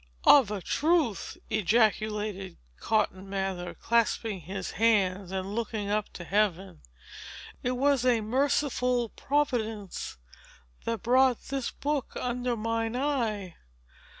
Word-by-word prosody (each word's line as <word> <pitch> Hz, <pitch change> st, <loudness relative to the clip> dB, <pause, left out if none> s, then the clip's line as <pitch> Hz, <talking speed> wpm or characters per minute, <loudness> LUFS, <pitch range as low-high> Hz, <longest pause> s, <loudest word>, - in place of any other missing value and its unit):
"Of 270 Hz, -8 st, +7 dB
a 205 Hz, -3 st, -4 dB
truth," 310 Hz, -, +1 dB
ejaculated 210 Hz, -2 st, +1 dB, 0.2 s
Cotton 195 Hz, -3 st, 0 dB
Mather, 190 Hz, -2 st, -3 dB
clasping 230 Hz, -3 st, 0 dB
his 185 Hz, +3 st, -5 dB
hands 195 Hz, -3 st, +2 dB
and 190 Hz, +1 st, -3 dB
looking 220 Hz, -2 st, -2 dB
up 210 Hz, 0 st, -1 dB
to 175 Hz, -, -7 dB
Heaven, 195 Hz, -, 0 dB, 0.8 s
"it 250 Hz, -, 0 dB
was 275 Hz, -1 st, +3 dB
a 245 Hz, -3 st, +3 dB
merciful 250 Hz, 0 st, +1 dB
Providence 225 Hz, -, -2 dB, 0.7 s
that 230 Hz, 0 st, -2 dB
brought 255 Hz, +1 st, +4 dB
this 270 Hz, -2 st, -2 dB
book 290 Hz, -2 st, -3 dB
under 245 Hz, -1 st, -1 dB
mine 225 Hz, +1 st, -1 dB
eye! 230 Hz, -, -1 dB
220 Hz, 110 wpm, -28 LUFS, 195-250 Hz, 0.8 s, Of